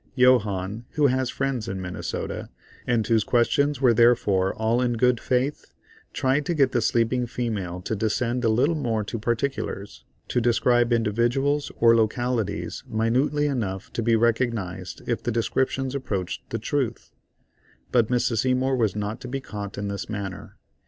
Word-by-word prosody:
Johannes, 110 -5 +3
who 150 -2 +2
has 130 -1 +2
friends 135 -5 -2
in 95 -3 -4
Minnesota, 90 -1 -5 0.4
and 120 -3 +2
whose 110 -2 +2
questions 140 +4 +2
were 125 -3 +5
therefore 105 -5 +3
all 110 +3 +1
in 125 -1 +1
good 125 0 +2
faith, 130 +5 -1 0.4
tried 135 +3 +1
to 175 - 0
get 140 -3 +3
the 120 - +1
sleeping 120 +2 +1
female 100 -8 -3
to 110 - -3
descend 120 +4 -1
a 115 - +3
little 130 +9 +3
more 115 -8 -1
to 110 +3 -5
particulars, 120 -3 -3 0.3
to 125 - +1
describe 120 0 +3
individuals 120 +6 +1
or 115 0 +6
localities 115 0 -1
minutely 125 +7 +1
enough 105 -9 -3
to - - -1
be 115 0 +3
recognised 115 -5 -1
if - - -1
the 120 - -2
descriptions 130 +3 0
approached 100 -10 -4
the 115 - -2
truth; 120 +1 -2 0.8
but 120 -3 +3
Mrs. 120 -2 +1
Seymour 130 +2 +1
was 110 -5 +1
not 105 +1 -3
to 125 - -7
be 135 +2 -3
caught 105 -5 -7
in 100 0 -3
this 100 0 -5
manner. 100 -4 -6
120 Hz, 160 wpm, -25 LUFS, 110-130 Hz, 0.8 s, or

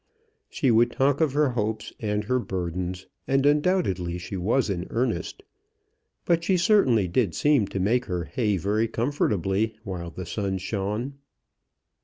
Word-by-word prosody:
She 135 -6 +1
would 115 +1 +4
talk 140 +3 +1
of 155 -4 +2
her 145 -1 +3
hopes 110 -2 -3
and 105 -1 -1
her 125 +4 +1
burdens, 90 -2 -4 0.2
and 135 +1 +2
undoubtedly 145 - +1
she 90 +3 -6
was 110 +8 +1
in 90 -3 -3
earnest. 125 - -2 0.8
But 170 -1 +2
she 185 +2 +2
certainly 170 - +4
did 90 -1 0
seem 145 -9 +3
to 95 - -4
make 120 +6 +1
her 90 -1 -2
hay 105 +3 0
very 105 +5 0
comfortably 110 - 0
while 90 -4 -5
the 90 +2 -7
sun 95 +2 -2
shone. 105 +8 -3
110 Hz, 150 wpm, -25 LUFS, 95-135 Hz, 0.8 s, would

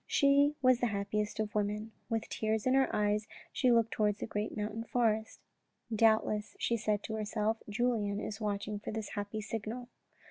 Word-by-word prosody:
She 285 +1 +4
was 255 -1 +5
the 245 - +2
happiest 210 +1 -2
of 215 +1 -1
women. 210 +1 -1 0.2
With 225 -1 -1
tears 220 -1 -1
in 255 - +3
her 265 -1 +4
eyes 210 +1 +1 0.3
she 255 -2 +3
looked 230 -1 +4
towards 210 -1 +1
the - - -2
great 210 -1 -3
mountain 210 +2 -3
forest. 225 -2 0 0.3
" 230 - -8
Doubt 220 0 +5
less," 210 0 -3
she 235 - +1
said 210 -2 0
to 220 - -5
herself, 215 +1 -1
" - - -12
Julien 210 -2 0
is 215 +1 -5
watching 205 0 -2
for - - -7
this 220 -1 -4
happy 205 +1 -4
signal." 225 +4 -5
215 Hz, 190 wpm, -32 LUFS, 210-230 Hz, 0.3 s, was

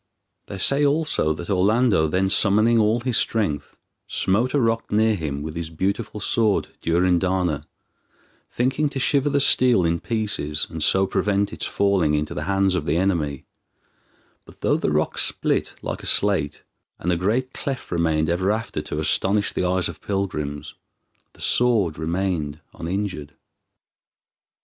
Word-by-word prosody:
They 100 - -7
say 140 +9 +3
also 145 - +1
that 85 +4 -6
Orlando 100 -2 +3
then 95 +5 +1
summoning 110 +4 +3
all 110 +2 +2
his 125 -1 0
strength, 100 -10 -1 0.3
smote 115 +8 0
a - - +3
rock 115 -2 0
near 110 +1 +3
him 75 -7 -4
with 80 +1 -6
his 85 -1 -4
beautiful 100 +6 -3
sword 110 0 +1
Durindana, 90 -2 +1 0.8
thinking 135 +5 0
to 140 - -5
shiver 140 +2 +2
the 140 0 +1
steel 125 -8 +4
in 85 0 0
pieces, 105 -10 -2
and 80 -1 -6
so 95 +5 +3
prevent 100 +1 0
its - - -3
falling 95 -7 +1
into 75 0 -2
the 75 - -4
hands 95 0 +1
of 90 -5 -2
the 75 +3 +1
enemy, 80 -7 -1 1.0
but - - -18
though - - +2
the - - -1
rock - - 0
split - - 0
like - - -4
a - - -3
slate, 80 -8 +2 0.3
and 90 - -2
a - - +2
great 115 +9 -1
cleft 135 -2 -5
remained 80 -2 +1
ever 90 +3 0
after 110 -7 -2
to 75 0 -5
astonish 100 +6 +1
the - - -1
eyes 90 -1 +1
of 85 - -9
pilgrims, 75 -7 -3 0.6
the - - -14
sword 105 -11 +2
remained 80 -3 -2
uninjured. 85 -5 -4
95 Hz, 155 wpm, -22 LUFS, 80-110 Hz, 1.0 s, steel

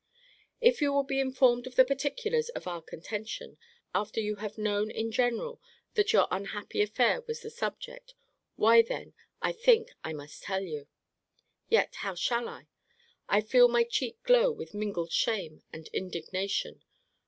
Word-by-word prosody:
If 480 -5 +4
you 285 -1 +3
will 280 0 +2
be 270 0 -1
informed 255 -2 +3
of 255 - -10
the 260 - +7
particulars 375 - -1
of 485 - -7
our 175 -2 -4
contention, 210 +7 -7 0.3
after 210 +2 -1
you 210 -1 -2
have 210 +1 -6
known 210 0 0
in 225 +1 -3
general 245 - 0 0.3
that 425 0 +2
your - - +5
unhappy 200 +2 -2
affair 235 - +2
was 460 0 -4
the 450 - -7
subject, - - -6 0.4
why 230 +2 +7
then, 230 - -6 0.3
I - - +2
think 470 0 +3
I 160 - -4
must 145 -1 -10
tell 190 0 -2
you. 150 -6 -6 0.8
Yet 460 - +3
how 195 -3 -4
shall 235 +6 0
I?==I 470 - -5
feel 245 +2 +7
my 240 0 +3
cheek 235 0 -2
glow - - +5
with 450 - -8
mingled 200 -5 -3
shame 180 -9 0
and 160 -1 -9
indignation. 185 +2 -3
235 Hz, 155 wpm, -30 LUFS, -, 0.8 s, the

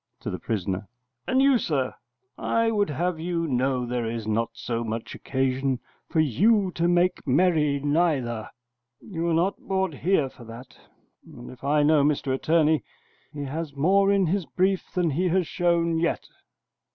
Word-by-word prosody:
[To - - -4
the - - -5
prisoner]: 95 -2 -3 0.4
And 260 +1 +3
you, 275 -3 +5
sir, 135 -9 -1 0.4
I 230 0 +1
would 205 -4 +1
have 170 +3 -1
you 170 0 -2
know 130 -2 0
there 120 -1 -2
is 115 -1 -4
not 110 +2 0
so 115 0 -3
much 110 0 -5
occasion 130 -1 -1 0.3
for 160 - 0
you 190 - +3
to 170 +1 0
make 175 -1 +1
merry 150 -1 +3
neither. 145 -7 0 0.5
You 170 -4 -5
were 170 - +1
not 180 +4 +1
brought 190 -3 -1
here 155 0 +1
for 130 - -14
that, 115 +3 -11 0.5
and 120 0 -11
if 125 0 -15
I 145 +1 +2
know 150 -1 +4
Mr 140 -2 +1
Attorney, 155 +2 +2 0.5
he 145 -1 -6
has 145 +1 -5
more 195 +7 +3
in 200 -2 +3
his 180 +1 -1
brief 190 +1 0
than 175 -3 0
he 175 +6 0
has 180 +1 +2
shown 170 0 +1
yet. 170 0 -1
155 Hz, 165 wpm, -25 LUFS, 130-180 Hz, 0.5 s, you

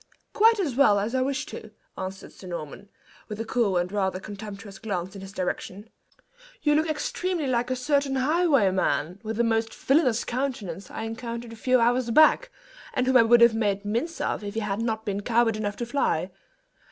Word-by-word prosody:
"Quite 450 +1 +5
as 305 -11 -1
well 230 -7 +5
as 210 +4 -2
I 260 - +1
wish 275 +2 -1
to," 220 - -9 0.3
answered 190 0 -7
Sir 185 - -12
Norman, 170 +3 -7 0.4
with 210 0 -7
a 225 - -3
cool 220 -5 +1
and 175 +1 -1
rather 190 -2 -1
contemptuous 200 -1 -9
glance 190 -4 -4
in 195 - -8
his 195 0 -9
direction. 195 +3 -4 0.7
"You 295 - +4
look 315 +2 +2
extremely 340 +2 -2
like 245 -1 0
a 255 - 0
certain 280 +1 0
highwayman, 255 - +2
with 220 0 -5
a - - +4
most 225 -1 0
villainous 265 -5 +2
countenance, 235 -8 -4
I - - -6
encountered 230 +1 -6
a - - -9
few 255 +3 +2
hours 240 +1 +2
back, 310 - +5 0.5
and 255 - +1
whom 260 0 +1
I - - +8
would 235 +1 +5
have 235 -1 +7
made 205 -2 -1
mince 240 +11 -2
most - - -3
of - - -2
if 205 +1 -6
he 225 - -1
had 210 0 -2
not 220 -1 -2
been 200 0 -2
coward 230 0 +2
enough 205 -1 -3
to 240 - -4
fly. 195 - 0
225 Hz, 200 wpm, -26 LUFS, 200-255 Hz, 0.7 s, I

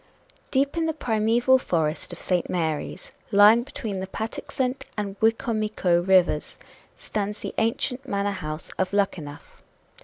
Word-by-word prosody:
Deep 275 +4 +1
in 325 -1 +1
the 320 - 0
primeval 235 0 +3
forest 160 -8 -1
of - - -7
St. 180 -2 0
Mary's, 160 -4 -3 0.2
lying 210 +3 +7
between 220 -6 -5
the 190 - -4
Patuxent 250 +5 -3
and 205 -2 -2
the 220 - +5
Wicomico 215 -6 +1
Rivers, 180 -4 +2 0.4
stands 210 0 -4
the - - -5
ancient 250 +4 -1
manor 200 -2 0
house 155 -5 -6
of 185 +1 0
Luckenough. 165 -8 -2
205 Hz, 140 wpm, -25 LUFS, 180-230 Hz, 0.4 s, lying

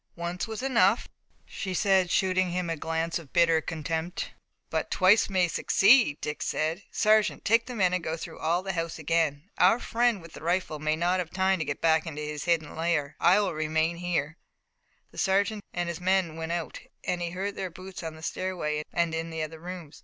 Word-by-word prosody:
"Once 175 +3 -3
was 220 +2 -5
enough," 230 -5 +3 0.4
she 190 -2 -5
said, 190 -1 +3
shooting 185 0 +2
him 175 -1 -2
a - - -1
glance 165 +2 -2
of 155 -5 -14
bitter 165 -2 +4
contempt. 160 +2 -3 0.4
"But - - -1
twice 195 +4 +4
may 185 -2 +2
succeed," 200 - +4
Dick 150 0 -4
said. 160 +5 -1
"Sergeant, 215 0 +2
take 230 +2 +3
the 250 - -6
men 185 -4 +2
and 180 -2 -1
go 160 +1 -2
through - - -8
all 170 +3 0
the 195 0 -3
house 165 -1 -3
again. 160 +1 0
Our 225 - +6
friend 235 -2 +1
with 165 -2 -13
the - - -10
rifle 170 -2 -1
may 155 +1 0
not 175 +3 +1
have 175 -3 -3
had - - -14
time 190 0 +2
to 160 - -1
get 145 - -4
back 160 0 +3
into 150 -1 -5
his 150 -1 -5
hidden 165 -3 0
lair. 160 -3 -1
I 180 +4 +5
will 205 - -1
remain 160 +2 0
here." 170 -3 -2 0.7
The - - -9
sergeant 200 +2 +1
and 175 0 -2
his 170 0 -5
men 185 -3 +1
went 165 0 -4
out 170 -2 -3 0.2
and 180 -1 -2
he 170 - -1
heard 195 +3 -4
their 190 - -3
boots 185 +2 -9
on 160 -2 -6
the 160 - -13
stairway 165 -5 -2
and 170 -1 0
in 165 +1 -3
the 160 -1 -3
other 160 +1 -7
rooms. 170 -3 -8
170 Hz, 210 wpm, -28 LUFS, 160-190 Hz, 0.7 s, Our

